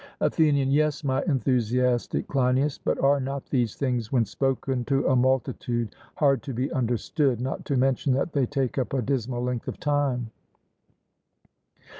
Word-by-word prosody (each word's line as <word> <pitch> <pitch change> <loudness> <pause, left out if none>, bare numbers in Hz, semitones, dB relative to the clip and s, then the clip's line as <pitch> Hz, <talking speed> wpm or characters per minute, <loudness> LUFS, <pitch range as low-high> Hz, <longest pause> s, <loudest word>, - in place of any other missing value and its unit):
ATHENIAN: 145 -4 +2
Yes, 150 +2 +1
my 135 -1 +1
enthusiastic 125 -3 +1
Cleinias; 135 +1 +1
but - - -1
are 140 +1 +4
not 135 +1 -4
these 120 -6 0
things 125 -5 -2
when 120 -4 +3
spoken 135 0 -1
to 135 -1 +1
a 130 - +3
multitude 125 -2 0 0.2
hard 140 -5 +3
to 135 - -6
be 130 +4 -1
understood, 125 +2 0
not 130 +2 -4
to 140 - 0
mention 135 +1 +1
that 140 +4 -1
they 135 -4 +1
take 135 -1 -1
up 130 - -2
a 135 - +1
dismal 125 -1 -2
length 125 -1 -3
of - - -5
time? 140 -6 0
130 Hz, 155 wpm, -26 LUFS, 125-140 Hz, 0.2 s, are